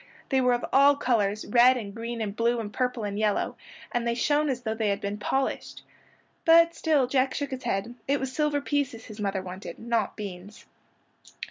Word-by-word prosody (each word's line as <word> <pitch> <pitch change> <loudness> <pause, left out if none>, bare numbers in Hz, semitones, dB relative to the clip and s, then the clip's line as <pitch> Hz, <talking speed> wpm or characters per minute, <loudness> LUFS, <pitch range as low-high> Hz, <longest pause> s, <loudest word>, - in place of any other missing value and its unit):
They 265 -1 +2
were 250 -1 +3
of 240 - -1
all 280 +1 +6
colors, 215 -6 0
red 250 +3 +5
and 205 -4 -6
green 230 +1 -5
and 205 -2 -3
blue 235 +1 +1
and 210 -2 -5
purple 250 -3 -1
and 205 0 -3
yellow, 210 -1 0 0.4
and 240 -1 -1
they 235 - +1
shone 295 +4 +1
as 250 -2 -2
though 220 -2 -2
they 220 -1 -1
had 200 - 0
been 200 +1 -4
polished. 265 +6 -2 0.6
But 335 +1 +6
still 305 -6 +2
Jack 260 +1 +1
shook 285 -1 -3
his 260 0 -6
head. 195 +5 -2
It 280 +1 +2
was 265 -1 -4
silver 295 -1 0
pieces 280 -6 -2
his 215 0 -11
mother 195 -2 -2
wanted, 185 +1 -8
not 230 -2 -1
beans. 200 0 -8
235 Hz, 200 wpm, -27 LUFS, 210-270 Hz, 0.6 s, all